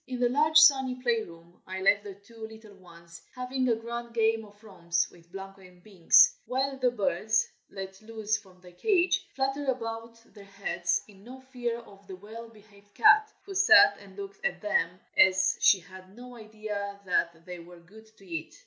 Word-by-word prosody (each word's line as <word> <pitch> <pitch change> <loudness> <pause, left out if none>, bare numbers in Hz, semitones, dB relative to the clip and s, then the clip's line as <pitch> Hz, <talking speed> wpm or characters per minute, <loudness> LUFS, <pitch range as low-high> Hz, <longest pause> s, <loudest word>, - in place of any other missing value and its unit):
In 255 -1 -5
the 245 -1 +2
large, 305 +4 +3
sunny 265 -5 +5
play 240 -3 0
room 170 -2 -14
I 190 0 -5
left 205 +2 +3
the 200 -2 -9
two 220 +3 -11
little 220 -1 -14
ones, 170 -3 -16
having 255 0 -2
a 230 - +3
grand 235 +1 -7
game 225 0 +1
of 205 0 -18
romps 175 -5 -2
with 170 0 -21
Blanco 195 +1 -10
and 180 -1 -18
Binks, 215 - +5
while 270 +2 -1
the 255 -1 +3
birds, 215 -1 0 0.2
let 190 0 -9
loose 215 -1 -3
from 190 -4 -11
their 180 -1 -15
cage, 365 - +1
fluttered 270 +1 -2
about 230 -2 -5
their 205 - -13
heads, 185 -3 -2
in 200 -2 -18
no 255 +3 -11
fear 250 -3 -5
of 200 -3 -18
the 190 - -8
well 220 +4 -11
behaved 205 -2 -21
cat, 425 0 +5
who 395 - -8
sat 395 +1 +6
and - - -16
looked 400 +2 -9
at 485 - -2
them 185 -4 -1 0.2
as 185 0 +4
if - - -25
she 195 - +6
had 185 +2 -15
no 245 +1 -12
idea 215 -2 -7
that 170 -2 -1
they 180 -1 -8
were 175 +1 -14
good 215 +6 -18
to 195 - -19
eat. 165 -3 -7
215 Hz, 195 wpm, -28 LUFS, 190-245 Hz, 0.2 s, sat